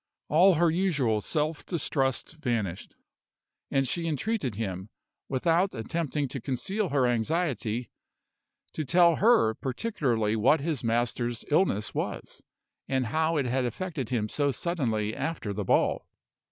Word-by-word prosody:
All 175 +4 +6
her 170 +1 +3
usual 145 - +1
self 150 - -2
distrust 140 -2 -1
vanished; 115 - -3 0.7
and 135 -1 +1
she 165 +6 -1
entreated 155 - -1
him, 95 -2 -4 0.4
without 165 +8 +1
attempting 145 +4 -2
to 135 - -5
conceal 190 - -2
her 135 -2 +2
anxiety, 120 - -1 0.8
to 155 - -2
tell 170 +2 +4
her 220 - +4
particularly 125 - -1
what 125 +8 +4
his 150 -3 -2
master's 120 +1 -1
illness 145 - +2
was, - - -4 0.5
and 130 -1 0
how 160 +1 +2
it 140 - +1
had 130 +1 0
affected 145 - -3
him 115 -4 0
so 145 +5 0
suddenly 120 -10 -1
after 150 -11 -3
the 105 +1 -3
ball. - - +2
135 Hz, 130 wpm, -28 LUFS, 115-165 Hz, 0.8 s, All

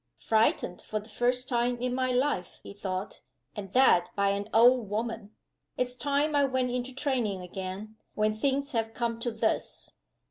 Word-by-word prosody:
"Frightened 220 -5 +1
for 215 - -3
the 215 +1 -14
first 245 +3 +1
time 245 -1 +1
in 250 0 -1
my 255 0 0
life," 250 -8 0
he - - -9
thought 190 -1 -5 0.3
"and 195 -2 -6
that 180 -9 +5
by 200 -1 +2
an 200 +1 -2
old 235 -1 +5
woman! 220 0 -4 0.4
It's 250 0 -1
time 285 +3 0
I 285 - +4
went 260 -2 0
into 250 +1 -3
training 250 -8 -1
again, 190 +4 -6 0.2
when 215 0 +1
things 275 +4 0
have 225 -2 -2
come 235 -1 -1
to 240 - -1
this!" 220 -1 -2
230 Hz, 170 wpm, -29 LUFS, 205-255 Hz, 0.4 s, that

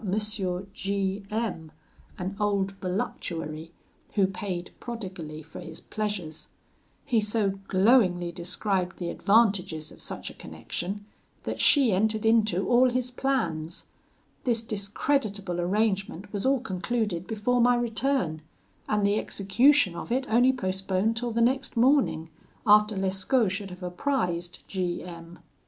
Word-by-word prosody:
G 195 0 -1
M, 210 -8 -3 0.5
an 185 +2 -4
old 200 -2 +1
voluptuary, 165 -4 -4 0.4
who 200 -2 +5
paid 185 -2 -4
prodigally 185 -10 -6
for 160 - -10
his 160 -2 -8
pleasures; 205 -7 -4 0.6
he 235 -5 +2
so 210 -2 0
glowingly 185 -4 +4
described 180 +2 -1
the 175 -2 -3
advantages 195 -7 +2
of - - -13
such - - -6
a - - -13
connection, 200 +4 -6 0.4
that - - -4
she 275 -6 +5
entered 215 +3 +1
into 215 -4 +3
all 250 +1 +5
his 250 0 -1
plans. 220 -12 -1 0.6
This 235 -3 +1
discreditable 200 -3 -1
arrangement 200 0 -1
was 205 +5 -1
all 270 -2 +3
concluded 195 -3 -2
before 235 +3 +1
my 245 +1 +5
return, 235 - 0 0.5
and 210 -1 +2
the 205 +1 +3
execution 205 +1 +3
of 170 - -6
it 260 +2 +1
only 245 +4 +5
postponed 190 -1 -1
till 240 +1 -2
the 235 0 0
next 255 +1 +1
morning, 240 - +3 0.3
after 210 -1 +5
Lescaut 195 +4 +1
should 200 0 -4
have 180 0 -10
apprised 180 -3 -2
G 180 -4 -2
M 170 -1 -10
200 Hz, 130 wpm, -27 LUFS, 180-230 Hz, 0.6 s, who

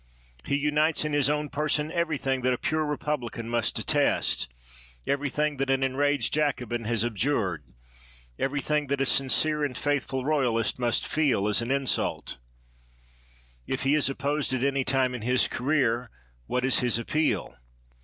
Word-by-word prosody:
He 140 - 0
unites 150 +2 +1
in 150 - -2
his 145 -2 +3
own 150 0 -1
person 150 +1 0
everything 150 -6 -1
that 130 0 +2
a - - -1
pure 155 +3 -1
republican 135 -6 -3
must 120 -2 0
detest; - - +1 0.5
everything 145 +1 -1
that 135 0 -1
an 135 0 +2
enraged 145 +2 +1
Jacobin 125 -6 -1
has 115 0 0
abjured; 110 - -1 0.8
everything 145 +2 0
that 140 0 -1
a 135 - +2
sincere 150 +3 +3
and 135 -4 -2
faith 145 -3 0
ful 130 -1 -3
royalist 125 -7 +1
must 120 -1 +1
feel 135 -10 +1
as 105 +2 +2
an 115 - -4
insult. 135 - -1 1.3
If 130 +1 -2
he 135 +1 +3
is 150 -2 +3
opposed 140 +1 -2
at 130 - -2
any 140 -1 +1
time 130 -1 +1
in 125 - -5
his 125 +3 +2
career, 125 -3 0 0.4
what 125 0 0
is 130 - +3
his 120 -2 +1
appeal? 150 +7 -1
135 Hz, 155 wpm, -27 LUFS, 125-150 Hz, 1.3 s, his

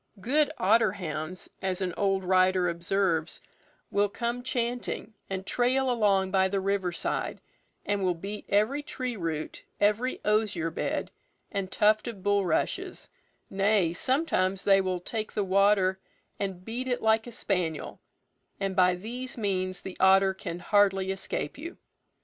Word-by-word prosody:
"Good 285 +8 +2
otter 215 +1 +4
hounds," 160 -2 -5
as 190 -1 -1
an 185 -2 -2
old 195 -1 +1
writer 185 0 +3
observes, 170 -1 0 0.5
"will 205 0 +2
come 235 +3 -3
chanting, 245 -2 -2 0.2
and 190 0 -4
trail 255 +4 +1
along 200 -5 +2
by 190 0 +3
the 195 +1 -1
river 195 -2 0
side, 175 - -2 0.5
and 205 -1 0
will 180 -1 +1
beat 200 +5 -7
every 215 +8 +2
tree 255 -4 -4
root, 165 -5 -4 0.2
every 210 +5 +1
osier 210 -6 +1
bed, - - -2 0.4
and 195 -3 -3
tuft 215 +3 +3
of 210 -6 -7
bulrushes; 200 -5 0 0.4
nay, 195 -3 +2
sometimes 195 - +1
they 195 -1 +5
will 185 -1 -1
take 215 +3 -4
the 210 - 0
water 195 0 +3 0.4
and 190 -2 -4
beat 245 +3 -4
it 250 -1 -1
like 220 +1 +3
a - - -7
spaniel, 180 -9 -2 0.6
and 195 -1 -2
by 180 -1 +4
these 245 +8 -6
means 185 -4 -1
the 190 - -7
otter 190 0 +5
can 175 -2 -6
hardly 195 0 +2
escape 190 - -4
you." 335 +4 -7
195 Hz, 145 wpm, -28 LUFS, 185-220 Hz, 0.6 s, they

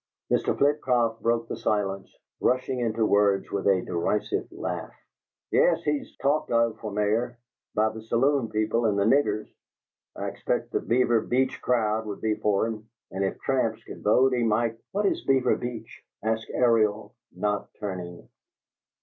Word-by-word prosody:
Mr. - - +1
Flitcroft 125 -6 +2
broke 115 0 +1
the - - -4
silence, 100 -2 -2 0.2
rushing 130 0 +1
into 115 -2 +1
words 100 -2 +2
with 100 0 -1
a 95 -2 +3
derisive 90 +4 -1
laugh: - - -4 0.6
"Yes, - - +3
he's 150 -1 -2
'talked 145 +3 +1
of' 115 -2 +2
for 110 - -5
Mayor 110 +4 0 0.4
by 110 +1 +3
the 110 0 -8
saloon 120 +2 +1
people 110 +2 0
and 105 -2 +2
the 100 - +3
niggers! 115 -1 +2 0.7
I - - -4
expect - - -2
the - - +1
Beaver 120 -1 +2
Beach 130 +3 0
crowd 110 -3 +1
would 100 - -5
be 110 -1 +1
for 105 -1 +1
him, 110 -1 -6 0.2
and 95 +1 -2
if 95 - -2
tramps 115 -5 0
could - - -10
vote 130 +5 +4
he 125 - +1
might 115 0 +1
" - - -65
"What 205 +1 0
is - - 0
Beaver 130 -2 +3
Beach?" 120 -2 -7 0.2
asked 110 0 -1
Ariel, 110 -3 +2 0.2
not 105 -1 -1
turning. 90 -4 -6
110 Hz, 160 wpm, -26 LUFS, 105-125 Hz, 0.7 s, vote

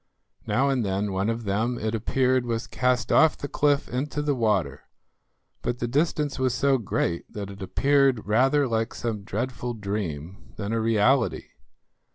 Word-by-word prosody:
Now 135 +3 +2
and 130 -3 +1
then 100 +1 -1
one 95 +3 0
of 115 0 -2
them, 110 +4 0
it 110 0 -2
appeared, 130 +3 +1
was 115 -1 -2
cast 125 -1 0
off 160 0 +5
the 145 - -5
cliff 145 0 +1
into 140 +4 -3
the 145 -1 +1
water, 100 - 0 0.8
but 120 - -2
the 120 - -2
distance 145 +1 0
was 130 -2 +1
so 135 0 +2
great 85 -5 -2
that 100 -1 -6
it 100 0 -11
appeared 135 +3 +2
rather 135 +6 +3
like 115 -1 -1
some 110 -3 -3
dreadful 120 +3 -3
dream 100 -5 -5
than 100 +1 -4
a 115 - 0
reality. 115 +3 +2
115 Hz, 165 wpm, -25 LUFS, 105-135 Hz, 0.8 s, off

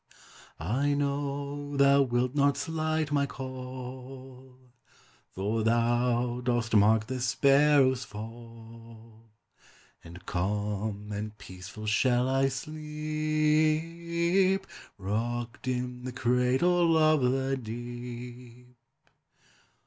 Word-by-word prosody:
I 130 - 0
know 145 0 -3
thou 140 0 +6
wilt 125 -1 0
not 140 -1 +2
slight 155 0 -1
my 140 -1 +2
call, 130 0 -9 0.7
For 105 +4 -2
thou 120 +2 +1
dost 120 -2 0
mark 110 +1 +5
the 130 +2 -4
sparrow's 135 0 +4
fall; 115 0 -12 0.7
And 85 +2 -12
calm 105 +2 -2
and 105 +1 -5
peaceful 95 +3 -10
shall 120 +3 +2
I 135 +1 +2
sleep, 155 +5 0 0.3
Rocked 115 +6 -3
in 125 -1 -3
the 130 - -4
cradle 130 +8 +2
of 155 -2 +4
the 135 +2 +1
deep. 120 +1 -8
125 Hz, 90 wpm, -29 LUFS, 115-145 Hz, 0.7 s, thou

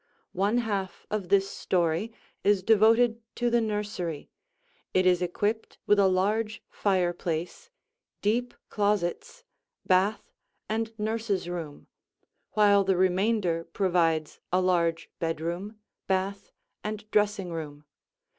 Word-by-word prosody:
One 200 +5 +1
half 200 -6 -2
of 205 -4 -2
this 195 0 +4
story 175 +3 0 0.3
is 200 -2 +3
devoted 225 +2 +4
to 240 -1 0
the 235 0 +3
nursery; 205 -7 -3 0.6
it 185 0 +4
is 180 -1 +4
equipped 205 +5 -2
with 205 - +4
a 195 - +6
large 210 +4 0
fireplace, 180 - -1 0.5
deep 240 +4 0
closets, 205 -4 -1 0.4
bath, 195 +3 +2 0.4
and 225 +1 -1
nurse's 215 -4 -1
room, 165 -5 -6 0.7
while 205 -2 +5
the 190 -1 +1
remainder 185 -2 +1
provides 165 -5 0
a 180 - +3
large 170 -3 +1
bedroom, 170 +6 -3 0.3
bath, 195 +1 -1 0.3
and 215 0 -4
dressing 205 -3 +1
room. 150 -2 -7
195 Hz, 110 wpm, -28 LUFS, 175-215 Hz, 0.7 s, a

